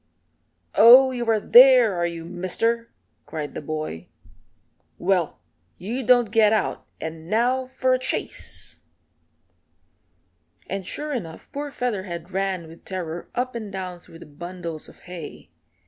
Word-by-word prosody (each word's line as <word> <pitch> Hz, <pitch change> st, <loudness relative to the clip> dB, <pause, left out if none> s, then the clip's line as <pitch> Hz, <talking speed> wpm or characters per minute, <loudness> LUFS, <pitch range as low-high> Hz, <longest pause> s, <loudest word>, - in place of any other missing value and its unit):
"Oh, 255 Hz, +4 st, +8 dB
you 240 Hz, -2 st, -3 dB
are 220 Hz, -1 st, +3 dB
there, 245 Hz, -1 st, +7 dB
are 175 Hz, -1 st, 0 dB
you, 165 Hz, -1 st, -6 dB
Mister?" 205 Hz, +7 st, -1 dB, 0.4 s
cried 150 Hz, -2 st, -5 dB
the -, -, -5 dB
boy. 155 Hz, -, -5 dB, 0.9 s
"Well, 180 Hz, -, 0 dB, 0.4 s
you 230 Hz, +9 st, -4 dB
don't 245 Hz, -3 st, +4 dB
get 220 Hz, -2 st, +5 dB
out, 220 Hz, -, -1 dB
and 160 Hz, +1 st, -7 dB
now 250 Hz, +4 st, +1 dB
for 260 Hz, 0 st, +1 dB
a 255 Hz, -, +2 dB
chase." 255 Hz, -, -4 dB, 1.9 s
And 195 Hz, -1 st, -5 dB
sure 300 Hz, 0 st, -3 dB
enough 170 Hz, -11 st, -6 dB
poor 290 Hz, +1 st, -4 dB
Featherhead 190 Hz, -, -4 dB
ran 190 Hz, -3 st, -2 dB
with 165 Hz, +1 st, -14 dB
terror 175 Hz, -3 st, -5 dB
up 255 Hz, +1 st, -1 dB
and 220 Hz, -4 st, -6 dB
down 185 Hz, -2 st, -5 dB
through 165 Hz, -, -15 dB
the -, -, -12 dB
bundles 170 Hz, +1 st, -7 dB
of -, -, -18 dB
hay. 175 Hz, -4 st, -9 dB
195 Hz, 135 wpm, -24 LUFS, 170-240 Hz, 1.9 s, Oh